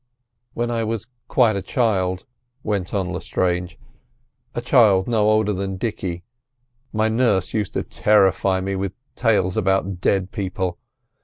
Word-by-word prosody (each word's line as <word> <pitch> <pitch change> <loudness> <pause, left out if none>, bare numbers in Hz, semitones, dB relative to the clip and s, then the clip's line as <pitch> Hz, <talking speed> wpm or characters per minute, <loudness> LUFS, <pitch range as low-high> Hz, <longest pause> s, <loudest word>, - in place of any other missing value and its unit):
"When 120 0 -1
I 115 -1 0
was 110 -1 -3 0.2
quite 115 -5 +3
a 100 - -2
child," 95 -4 0 0.4
went 100 -4 -2
on 95 -3 -1
Lestrange, 90 -1 -2 0.8
"a - - 0
child 110 -7 +4
no 110 -3 +2
older 110 -1 +2
than 95 0 -3
Dicky, 90 -4 -3 0.7
my 110 0 +1
nurse 110 -5 +1
used 105 -4 -2
to - - 0
terrify 95 -2 +2
me 95 +1 -2
with 95 0 -3 0.2
tales 105 -5 +1
about 95 -2 0
dead 95 0 +1
people. 95 -2 -3
100 Hz, 140 wpm, -22 LUFS, 95-110 Hz, 0.8 s, child